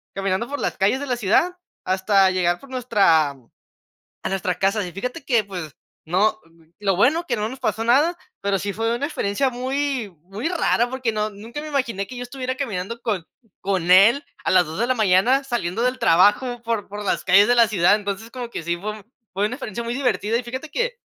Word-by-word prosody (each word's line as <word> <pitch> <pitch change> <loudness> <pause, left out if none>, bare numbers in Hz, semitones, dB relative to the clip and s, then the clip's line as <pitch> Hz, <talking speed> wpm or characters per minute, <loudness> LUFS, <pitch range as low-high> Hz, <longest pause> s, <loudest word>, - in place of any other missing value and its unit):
caminando 195 +3 -1
por 285 +1 -5
las - - -2
calles 205 +8 +2
de 285 - -4
la 245 -2 -1
ciudad, 330 - +2 0.3
hasta 190 +1 +3
llegar 175 -1 +1
por 275 - -14
nuestra 200 - +3
a 130 -4 -21 0.6
nuestra 185 -2 -2
casa, 195 +2 +1
y - - -6
fíjate 250 +7 -5
que 235 -5 +2
pues 180 -7 -7 0.3
no, 210 +6 +1 0.4
lo 195 -3 +1
bueno 300 - +3
que - - 0
no 215 +1 -1
nos 260 +2 -9
pasó 225 - -1
nada, 290 +9 +3 0.2
pero 200 0 0
sí 200 +2 -3
fue 225 +3 -1
una 280 +4 -2
experiencia 260 -2 0
muy 260 -2 -2
muy 200 - -4
rara 245 -8 +1
porque 255 -3 -2
no 215 0 -1
nunca 225 +8 -8
me 310 - -7
imaginé 235 -9 -1
que 255 - -9
yo 245 - -5
estuviera 255 0 -4
caminando 230 -3 -4
con 195 -7 -2 0.3
con 185 -3 -1
él 215 +10 +6 0.2
a - - +1
las 180 -2 +5
2 160 +3 -7
de 235 - +2
la 255 - +3
mañana, 220 +5 +3
saliendo 230 -5 -2
del 250 +1 0
trabajo, 210 +8 +3
por 230 -3 -2
por 205 +1 -7
las - - 0
calles 205 +3 +6
de 245 - +5
la 235 -2 +5
ciudad, 190 -2 +4
entonces 205 +2 -5
como 245 -2 -6
que 170 - -5
sí 170 +1 -1
fue 210 +3 -6 0.3
fue 200 +2 0
una 235 - -4
experiencia 235 -4 -5
muy 235 +1 -3
divertida, 230 -4 0
y 250 - -3
fíjate 260 +6 -7
que, - - -1
220 Hz, 215 wpm, -22 LUFS, 195-255 Hz, 0.6 s, él